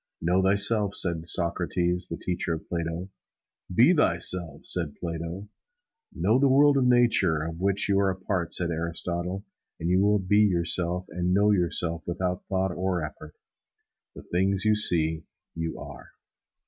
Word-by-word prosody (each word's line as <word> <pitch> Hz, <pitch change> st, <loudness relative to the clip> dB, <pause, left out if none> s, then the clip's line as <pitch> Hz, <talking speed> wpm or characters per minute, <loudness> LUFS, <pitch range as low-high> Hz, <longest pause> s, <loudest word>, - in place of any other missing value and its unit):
"Know 90 Hz, +3 st, +2 dB
thyself," 100 Hz, +1 st, +3 dB
said 85 Hz, -2 st, -2 dB
Socrates, 90 Hz, +1 st, -1 dB
the 85 Hz, -, -4 dB
teacher 90 Hz, -2 st, -2 dB
of 80 Hz, -, -10 dB
Plato. 85 Hz, +2 st, -4 dB, 0.6 s
"Be 120 Hz, -, +5 dB
thyself," 85 Hz, -, 0 dB
said 85 Hz, -5 st, -2 dB
Plato. 85 Hz, +3 st, -5 dB, 0.6 s
"Know 115 Hz, +4 st, +1 dB
the 140 Hz, -, +4 dB
world 145 Hz, +2 st, +5 dB
of 135 Hz, -2 st, +2 dB
Nature, 115 Hz, -10 st, +3 dB
of 80 Hz, +1 st, -6 dB
which 100 Hz, +1 st, +1 dB
you 100 Hz, -1 st, +2 dB
are 100 Hz, -1 st, +2 dB
a 95 Hz, -, -2 dB
part," 95 Hz, -2 st, -3 dB
said 85 Hz, -1 st, -2 dB
Aristotle; 85 Hz, +3 st, -3 dB, 0.3 s
"and 85 Hz, +2 st, -1 dB
you 90 Hz, +1 st, +3 dB
will 105 Hz, +1 st, +3 dB
be 100 Hz, +1 st, +2 dB
yourself 90 Hz, -2 st, +1 dB
and 90 Hz, +1 st, -1 dB
know 105 Hz, +1 st, +4 dB
yourself 85 Hz, -3 st, 0 dB
without 90 Hz, +1 st, -3 dB
thought 95 Hz, -1 st, 0 dB
or 90 Hz, -2 st, -1 dB
effort. 75 Hz, 0 st, -11 dB, 0.8 s
The -, -, -10 dB
things 95 Hz, +3 st, 0 dB
you 110 Hz, 0 st, +4 dB
see, 80 Hz, -6 st, +1 dB, 0.3 s
you 80 Hz, 0 st, -4 dB
are." -, -, -10 dB
90 Hz, 155 wpm, -26 LUFS, 85-100 Hz, 0.8 s, Be